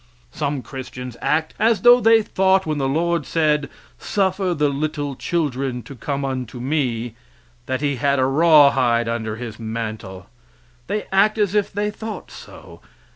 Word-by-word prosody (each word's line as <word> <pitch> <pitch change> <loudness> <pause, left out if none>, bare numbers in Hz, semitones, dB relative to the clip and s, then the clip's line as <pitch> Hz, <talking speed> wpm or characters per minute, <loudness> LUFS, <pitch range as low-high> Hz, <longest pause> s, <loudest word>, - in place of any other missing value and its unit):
Some 145 -4 -3
Christians 125 -2 -8
act 160 +1 0
as 225 0 +2
though 245 +1 +8
they 225 -2 +5
thought 190 -1 +2
when 155 -2 -2
the 135 -1 0
Lord 170 +2 0
said, 150 -2 0 0.3
"Suffer 190 -2 0
little 145 -1 -1
children 135 -6 -2
to 125 - -10
come 140 +3 -3
unto 130 -3 -4
me" 125 -4 -1 0.5
that 130 +1 -2
he 140 -2 0
had 140 +3 +1
a 130 - +2
raw 150 +1 +6
hide 120 -3 +1
under 110 -2 -3
His 115 -1 -8
mantle 110 -5 -6 0.6
they 210 0 -2
act 205 +3 +3
as 205 -3 +1
if 210 -1 +1
they 205 +1 -2
thought 220 +1 -7
so. - - -13
145 Hz, 155 wpm, -21 LUFS, 125-180 Hz, 0.6 s, though